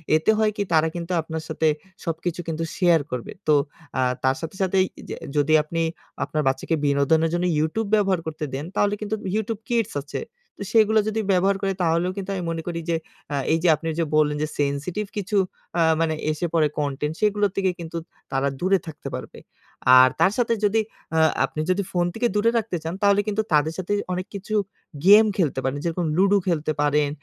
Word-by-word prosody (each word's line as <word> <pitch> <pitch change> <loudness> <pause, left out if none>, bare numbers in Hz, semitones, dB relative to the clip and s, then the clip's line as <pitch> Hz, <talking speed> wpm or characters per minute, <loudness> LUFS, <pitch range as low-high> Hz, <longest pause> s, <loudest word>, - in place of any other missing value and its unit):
এতে 160 +7 +3
হয় 215 -1 +3
কি? 205 - +1
তারা 160 0 +4
কিন্তু 170 +1 -5
আপনার 160 0 -5
সাথে 160 0 +1 0.4
সবকিছু 165 +1 -3
কিন্তু 165 0 -2
শেয়ার 175 -4 +4
করবে। 125 -2 -4 0.2
তো 155 - +5 0.4
আ - - +3 0.2
তার 130 0 +3
সাথে 165 +3 -6
সাথেই 190 0 +3
এই - - -5 0.2
যে - - -3 0.2
যদি 145 +2 +3
আপনি 165 +2 -3 0.4
আপনার 155 -1 -1
বাচ্চাকে 135 +5 0
বিনোদনের 145 +3 +3
জন্য 175 +1 0
YouTube 200 +8 -1
ব্যবহার 195 -4 +2
করতে 155 -1 -4
দেন 140 +3 -3
তাহলে 205 0 +2
কিন্তু 210 +1 -2 0.2
YouTube 220 0 -2
Kids 230 -3 0
আছে। 145 - -5 0.4
তো - - -5
সেগুলো 220 -1 +5
যদি 220 +1 0
ব্যবহার 190 +2 +3
করে 195 -1 0
তাহলেও 170 +1 +1
কিন্তু 195 -1 -5
আমি 180 - -3
মনে 165 0 -3
করি 170 -1 -2
যে 165 - +2 0.4
আ - - 0 0.2
এই - - +4
যে - - +4
আপনি 165 - -7
যে 165 - +2
বললেন 150 -1 +3
যে - - 0
সেনসিটিভ 145 +8 -1
কিছু 205 +1 -1 0.4
আ - - +4 0.2
মানে 160 -1 +1 0.2
এসে 155 +3 -2
পড়ে 160 -2 +4
কনটেন্ট 150 +1 -2
সেগুলো 210 -1 +2
থেকে 190 -1 +1
কিন্তু 170 0 -6 0.3
তারা 135 0 +1
দূরে 190 +2 +3
থাকতে 155 - -8
পারবে। - - -8 0.6
আর 130 0 +7
তার 165 +4 +5
সাথে 235 -2 +2
যদি 210 +2 +3 0.4
আ - - +5 0.3
আপনি 155 - -5
যদি 195 +2 +1
ফোন 175 -1 +1
থেকে 240 +2 +1
দূরে 210 +2 +3
রাখতে 220 -5 -1
চান 165 +1 -3
তাহলে 200 0 +5
কিন্তু 210 +1 +1
তাদের 150 +1 +3
সাথে 185 +2 -2 0.2
অনেক 185 +1 -3
কিছু 200 +2 -4 0.5
গেম 210 +3 +9
খেলতে 155 -8 +1
পারেন। 135 +2 -1
যেরকম 170 +1 -1
লুডু 200 +2 +4
খেলতে 160 -3 0
পারেন, 150 0 +2
170 Hz, 200 wpm, -24 LUFS, 155-200 Hz, 0.6 s, গেম